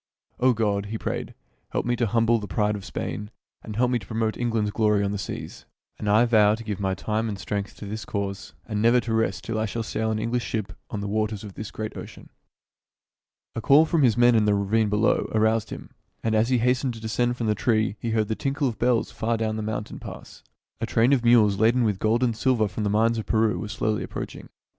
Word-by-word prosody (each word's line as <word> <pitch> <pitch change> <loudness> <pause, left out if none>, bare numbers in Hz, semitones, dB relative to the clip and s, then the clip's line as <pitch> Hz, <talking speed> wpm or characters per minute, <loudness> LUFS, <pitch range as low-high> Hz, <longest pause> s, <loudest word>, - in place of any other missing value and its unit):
"O 125 0 +4
God," 105 -3 0
he 110 +2 -4
prayed, - - -4 0.4
"help - - -1
me 120 0 +1
to 120 -1 +1
humble 115 +1 +2
the 105 - -6
pride 105 +3 0
of 100 - -7
Spain, 105 +2 -5 0.3
and 105 - -8
help 125 +2 +2
me 125 - +1
to 95 - -14
promote 110 0 -1
England's 115 -3 0
glory 105 -2 +2
on 100 - 0
the 100 - -3
seas. 95 - -7 0.3
And 105 - -2
I 110 +4 +5
vow 110 -3 +4
to 115 - -9
give 105 -3 -4
my 95 -1 0
time 110 +3 -2
and 100 - -4
strength 100 +1 -4
to - - -9
this 110 +2 -5
cause, 100 -1 -4
and 105 -2 -2
never 120 +2 +5
to 115 -1 -3
rest 95 -6 0
till 115 0 -2
I 110 - 0
shall 115 +3 -3
sail 110 0 -2
an 110 - 0
English 115 +2 -1
ship 105 -5 -3 0.2
on 105 - -4
the 100 - -3
waters 110 0 -1
of 105 -2 -9
this 105 +1 -6
great 110 0 -6
ocean." - - -10 1.2
A 115 - -2
call 145 +7 +6
from 160 -1 +1
his 120 -4 +4
men 120 0 +6
in 110 -2 +3
the 105 -1 +3
ravine 105 +2 +1
below 105 +1 +1
aroused 110 0 +2
him; - - -8 0.3
and 110 - 0
as 110 +2 +2
he 130 - +3
hastened 125 +1 +1
to - - -9
descend 120 +2 -1
from 115 - -2
the 105 - +2
tree 110 -1 +1
he 115 - -3
heard 110 -1 +1
the 110 - -1
tinkle 140 +3 -1
of 115 - -4
bells 120 -1 +1
far 115 +1 -1
down 110 -1 -1
the 110 - -3
mountain 105 0 -4
pass. - - -10 0.4
A - - -2
train 120 +5 +3
of 125 -3 +2
mules 110 -4 +5
laden 120 +3 +4
with 105 -4 0
gold 115 +3 +2
and 120 -3 +1
silver 115 -2 +2
from 105 +2 -4
the 105 - +1
mines 115 +2 +2
of 110 - -6
Peru 110 -1 +2
was 105 -1 -5
slowly 110 +1 -1
approaching. - - -7
110 Hz, 240 wpm, -25 LUFS, 105-115 Hz, 1.2 s, call